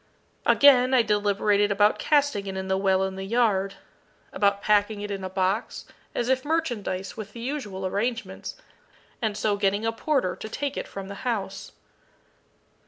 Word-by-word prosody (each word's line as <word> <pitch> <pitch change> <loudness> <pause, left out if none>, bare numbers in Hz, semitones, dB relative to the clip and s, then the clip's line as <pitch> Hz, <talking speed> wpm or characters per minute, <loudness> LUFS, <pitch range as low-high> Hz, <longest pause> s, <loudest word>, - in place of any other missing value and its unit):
Again, 260 -2 +6
I 245 - +5
deliberated 205 -1 +2
about 205 +1 +3
casting 285 -9 +2
it 190 0 -4
in 190 0 -4
the 190 - +2
well 190 0 +2
in 190 0 -3
the 190 - -4
yard 200 -3 +1 0.6
about 200 -1 +2
packing 210 0 +2
it 205 0 -5
in 195 -1 -4
a 185 - -3
box, 190 +3 -1 0.3
as 240 - -1
if 260 0 +1
merchandise, 240 - -2
with 215 -2 -8
the 235 - -9
usual 230 -7 -4
arrangements, 230 +5 -3 0.7
and 215 -3 -1
so 210 -2 +1
getting 200 +2 +1
a 225 - +2
porter 240 -6 0
to 220 - -8
take 280 +4 -3
it - - -4
from 195 -1 -7
the 200 - -6
house. 195 -6 -3
205 Hz, 170 wpm, -26 LUFS, 195-240 Hz, 0.7 s, Again